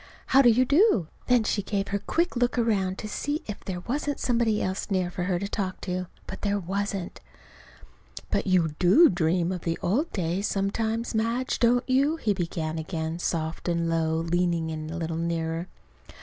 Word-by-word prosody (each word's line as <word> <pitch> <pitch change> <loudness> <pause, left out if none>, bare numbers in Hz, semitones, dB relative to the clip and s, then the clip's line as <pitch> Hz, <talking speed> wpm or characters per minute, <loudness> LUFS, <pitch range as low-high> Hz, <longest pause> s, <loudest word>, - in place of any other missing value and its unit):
"How 270 - +5
do 245 - +6
you 245 +3 +4
do?" 280 - +3 0.2
Then 245 -2 +4
she 210 -1 0
gave 200 0 -2
her 200 - -1
quick 340 - 0
little - - -1
look 245 +1 +1
around 195 -5 +1
to 215 - -5
see 290 +8 -3
if 210 - -7
there 180 -2 -4
wasn't 290 +6 -2
somebody 230 -3 +1
else 190 +1 -2
near 185 -3 0
for 180 0 -3
her 180 -1 +1
to 200 +3 -3
talk 190 -3 -3
to. 180 -1 -3 0.2
But 190 - -8
there 205 0 +1
wasn't. 195 0 -3 1.1
"But - - 0
you 180 -4 +3
do 195 - +7
dream, 175 0 +1
of 180 -2 -4
the 165 -1 -2
old 275 - +1
days, 180 +2 -1
sometimes, 220 +4 -1
Madge, 230 +4 0
don't 245 +1 +3
you?" 275 +4 +3
he 220 -10 0
began 165 -3 -3
again, 160 0 -3
soft 165 0 -2
and 170 -1 0
low, 165 -1 +1
leaning 165 0 0
a 155 +1 -5
little 165 -1 -3
nearer. 165 0 -2
190 Hz, 185 wpm, -26 LUFS, 170-230 Hz, 1.1 s, do